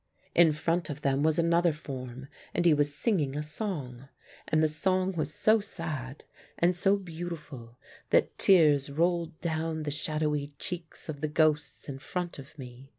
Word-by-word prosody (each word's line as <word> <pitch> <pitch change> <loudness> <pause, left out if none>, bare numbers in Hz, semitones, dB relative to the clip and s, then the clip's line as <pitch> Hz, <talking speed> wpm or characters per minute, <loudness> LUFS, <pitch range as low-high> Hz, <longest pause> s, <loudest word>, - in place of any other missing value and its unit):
In 170 -2 +6
front 165 +2 -1
of 150 0 -6
them 135 0 +2
was 155 +1 +3
another 170 +1 +3
form, 130 -4 -7 0.3
and 175 - +1
he 170 - +7
was 145 -1 +1
singing 150 -5 0
a 150 - -2
song, 145 - -5 0.4
and 155 0 +2
the - - +5
song 185 +4 +1
was 155 -5 -2
so 215 +7 +4
sad 155 -9 -5 0.3
and 175 +1 +3
so 195 +3 +3
beautiful 160 -9 -8 0.3
that - - +3
tears 150 -7 +5
rolled 170 +2 0
down 160 -1 -2
the 150 - -2
shadowy 150 -1 -1
cheeks 165 +1 -7
of 145 -3 -6
the 155 - 0
ghosts 150 -2 +1
in 135 -2 -6
front 175 +2 -4
of 140 +3 -12
me. 130 0 -10
155 Hz, 165 wpm, -29 LUFS, 145-170 Hz, 0.4 s, he